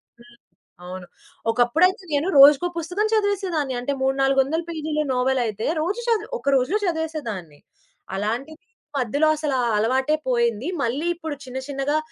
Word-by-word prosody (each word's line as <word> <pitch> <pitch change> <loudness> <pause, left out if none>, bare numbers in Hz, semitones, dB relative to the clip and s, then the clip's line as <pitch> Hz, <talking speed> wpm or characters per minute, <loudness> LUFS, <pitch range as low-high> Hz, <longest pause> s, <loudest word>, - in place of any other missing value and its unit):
హ్మ్. 235 0 -21 0.5
అవును. 180 0 -8 0.4
ఒకప్పుడైతే 325 - +2
నేను 290 +4 +1
రోజుకో 290 +5 +8
పుస్తకం 360 +6 -1
చదివేసేదాన్ని. 380 - 0
అంటే 280 +3 -2
3,4 270 0 +2
వందల 320 +5 -2
పేజీలు 310 -2 -2
నోవెల్ 255 +1 +1
అయితే 215 0 -3
రోజు 390 +8 -1
చది 440 -2 +1
ఒక 280 - -14
రోజులో 265 +11 +2
చదివేసేదాన్ని. 285 - -4 0.6
అలాంటిది 245 - -3
ఈ - - -43 0.3
మధ్యలో 285 +6 +1
అసల 300 -2 -2 0.2
అలవాటే 260 +7 +2
పోయింది. 235 +1 +1
మళ్ళీ 265 +8 -1
ఇప్పుడు 320 -3 -6
చిన్న 255 +1 -7
చిన్నగా 285 +2 -1
280 Hz, 140 wpm, -23 LUFS, 245-320 Hz, 0.6 s, రోజుకో